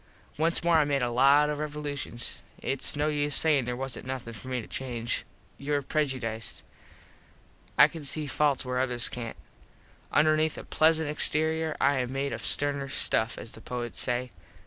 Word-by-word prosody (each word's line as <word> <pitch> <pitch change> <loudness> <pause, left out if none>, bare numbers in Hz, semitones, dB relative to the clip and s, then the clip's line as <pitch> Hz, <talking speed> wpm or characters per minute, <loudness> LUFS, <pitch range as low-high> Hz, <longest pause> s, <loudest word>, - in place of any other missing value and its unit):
Once 165 +3 +1
more 170 -1 +4
I 155 - +5
made 140 -2 0
a 120 - 0
lot 140 +4 +5
of 145 - -3
revolushuns. 145 -5 -4 0.2
Its 135 - -1
no 145 +1 +1
use 145 -1 0
sayin 150 -5 +3
there 125 0 -3
wasnt 135 0 -5
nothin 125 -3 -5
for 110 +4 -9
me 130 -1 -1
to 110 - -7
change. 120 -3 -3 0.4
Youre 145 0 -1
prejudiced. 130 -8 -1 1.1
I - - +9
can 165 - -9
see 150 +2 0
falts 145 -1 +1
where 125 0 -1
others 125 -2 +1
cant. 115 -2 -6 0.7
Underneath 155 +1 +3
a - - -6
plesant 160 0 +3
exterior 155 +1 0
I 140 0 +3
am 125 -1 -1
made 135 +1 -2
of - - -5
sterner 140 -1 0
stuff, 110 -3 +1
as 115 - -8
the 110 - -11
poets 120 0 -4
say. 125 0 -1
140 Hz, 170 wpm, -28 LUFS, 125-150 Hz, 1.1 s, I